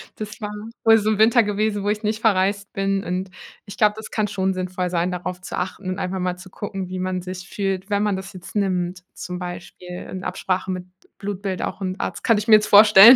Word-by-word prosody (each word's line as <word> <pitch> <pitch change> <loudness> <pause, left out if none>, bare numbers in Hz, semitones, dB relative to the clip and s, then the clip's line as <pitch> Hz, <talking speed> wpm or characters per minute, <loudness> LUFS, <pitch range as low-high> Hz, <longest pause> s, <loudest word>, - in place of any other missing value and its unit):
Das 215 0 -7
war 210 - -3 0.3
wohl 225 0 +7
so 215 +1 0
im 215 - +2
Winter 230 +2 +6
gewesen, 205 0 0
wo 205 - 0
ich 210 +1 -1
nicht 215 +1 -1
verreist 200 -2 +2
bin, 195 0 0
und 185 +1 -3 0.3
ich 200 - -10
glaube, 210 -1 +4
das 220 - -8
kann 215 -2 +1
schon 190 -2 0
sinnvoll 180 -1 -2
sein, 175 +1 +1
darauf 180 0 -4
zu - - -6
achten 185 +1 -3
und 185 - -2
einfach 185 +1 -2
mal 180 0 -1
zu 185 0 -12
gucken, 195 -2 -5
wie 185 0 -5
man 185 -1 -2
sich 185 -1 -7
fühlt, 195 -1 -2
wenn 205 0 +2
man 210 -2 +1
das 190 +1 -6
jetzt 185 +2 -11
nimmt, 180 -2 0
zum 180 0 -5
Beispiel 175 0 -7 0.2
in 185 0 -5
Absprache 185 0 -2
mit 185 -1 -3 0.3
Blutbild 200 -2 -3
auch - - -4
'n 185 -1 -2
Arzt, - - -3
kann 230 -4 +4
ich 210 - -2
mir 215 - +9
jetzt 215 0 +3
vorstellen, 210 +3 +10
195 Hz, 235 wpm, -23 LUFS, 185-210 Hz, 0.3 s, vorstellen